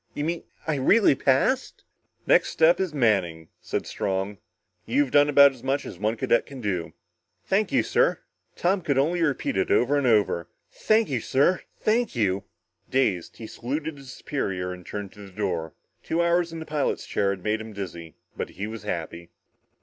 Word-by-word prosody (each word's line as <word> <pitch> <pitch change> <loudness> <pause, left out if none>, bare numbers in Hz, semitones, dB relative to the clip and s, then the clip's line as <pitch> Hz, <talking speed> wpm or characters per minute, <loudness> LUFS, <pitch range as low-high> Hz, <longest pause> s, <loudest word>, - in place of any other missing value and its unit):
You 145 - -2
mean 165 +2 -2 0.2
I 155 -2 0
really 200 +8 +5
passed?" 135 - +1 0.4
"Next - - +4
step 165 +2 +4
is 190 -3 -1
Manning," 95 - +1
said - - -3
Strong. 95 +1 -3 0.5
"You've 145 -3 +1
done 145 0 +5
as 140 -3 +7
much 135 +2 -1
as 85 - -9
one 110 +3 0
cadet 120 - +1
can 135 -2 -9
do." 95 -7 -3 0.5
"Thank 200 +1 +1
you, - - +3
sir" - - +2 0.4
Tom 185 +2 +1
could 140 -5 0
only 165 +6 +2
repeat 145 -10 0
it 95 - +1
over 145 +4 +3
and 135 - 0
over 105 -7 +2 0.2
"thank 220 +1 +2
you, 130 -4 -1
sir 140 +10 +2 0.2
thank 225 - +1
you." 100 -3 0 0.4
Dazed, 105 -10 0
he 115 - -8
saluted 145 +7 -4
his 135 -2 -11
superior 90 -12 -3
and 90 0 -11
turned 100 +1 -6
to - - -17
the 100 - -12
door. 90 -5 -3 0.3
Two 165 - -2
hours 170 0 +2
in 165 - -6
the 160 - -6
pilot's 150 -2 -1
chair 100 - 0
had 95 -2 -3
made 110 +1 0
him 110 0 -8
dizzy. 85 -5 -7 0.2
But - - -4
he 100 - -3
was 110 0 -6
happy. 85 -3 -5
125 Hz, 180 wpm, -25 LUFS, 100-155 Hz, 0.5 s, as